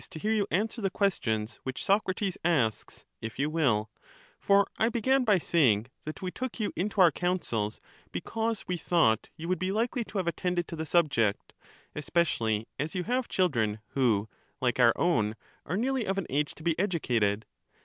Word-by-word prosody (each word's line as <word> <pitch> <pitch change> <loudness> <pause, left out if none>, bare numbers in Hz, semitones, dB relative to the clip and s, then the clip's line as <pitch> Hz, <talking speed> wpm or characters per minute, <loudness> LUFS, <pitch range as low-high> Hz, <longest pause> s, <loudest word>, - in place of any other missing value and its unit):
99 - - -9
to 160 - -8
hear - - +2
you 205 -2 +1
answer 220 +4 -1
the 195 - +1
questions 115 - -1
which 130 -1 -5
Socrates 195 -1 +1
asks, 145 -11 0 0.2
if 115 0 -6
you 145 +3 0
will: 115 -10 +1 0.5
for 200 0 +4
I 225 - +3
began 255 +3 +2
by 210 -5 +4
saying 130 - +2
that 155 +4 -6
we 185 - -2
took 255 +2 -5
you 210 - -1
into 200 +2 0
our 175 -3 +7
counsels 135 - -1 0.3
because 225 - -2
we 180 - -1
thought 155 -10 +2
you 165 - -6
would 185 +1 0
be 185 +1 -1
likely 230 +3 0
to 210 - -6
have 185 - 0
attended 175 +1 -1
to - - -5
the 160 0 -4
subject, 140 - +1 0.4
especially 120 -8 0
as 155 +6 -3
you 180 - -1
have 250 +4 -1
children 115 - +1
who, 115 -7 +1 0.3
like 125 -2 0
our 120 -2 +6
own, 110 -11 +1 0.3
are 180 - -1
nearly 255 +1 0
of 195 +1 0
an 195 - -1
age 145 +2 0
to 155 - -13
be 170 0 +2
educated. 120 - +1
170 Hz, 185 wpm, -29 LUFS, 120-195 Hz, 0.5 s, our